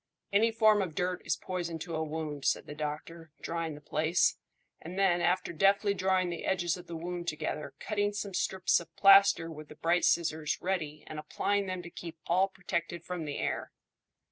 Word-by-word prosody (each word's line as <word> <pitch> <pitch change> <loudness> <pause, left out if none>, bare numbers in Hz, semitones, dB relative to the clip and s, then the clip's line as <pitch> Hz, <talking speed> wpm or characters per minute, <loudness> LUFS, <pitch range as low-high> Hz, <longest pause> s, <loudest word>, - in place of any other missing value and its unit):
"Any 220 +3 +5
form 215 -2 +4
of 175 -5 -3
dirt 180 +1 -1
is 155 - +1
poison 175 -2 -4
to 165 +1 -5
a 160 - 0
wound," 155 -2 -4
said - - +1
the - - -7
doctor, 155 +2 -5
drying 165 -2 -3
the 150 - -12
place; 155 +3 +2 0.5
and 175 +3 -8
then, 185 -3 +3
after 180 0 +1
deftly 200 +4 +3
drawing 185 -2 +1
the 170 - -5
edges 175 -3 +1
of 180 - -11
the 170 - -6
wound 175 +1 -5
together, 155 -1 -3
cutting 205 -1 -1
some 205 -1 -4
strips 185 +1 +2
of 170 - -13
plaister 195 -4 +6
with 155 -1 -9
the 150 - -12
bright 170 +3 +1
scissors 160 -3 +1
ready, 165 -5 -2
and 155 - -7
applying 200 +6 -1
them 185 -1 -4
to 170 - -9
keep 170 -1 -8
all 185 +3 +3
protected 170 -2 -4
from 180 -2 -4
the 145 - -4
air. - - -2
175 Hz, 195 wpm, -31 LUFS, 160-190 Hz, 0.5 s, plaister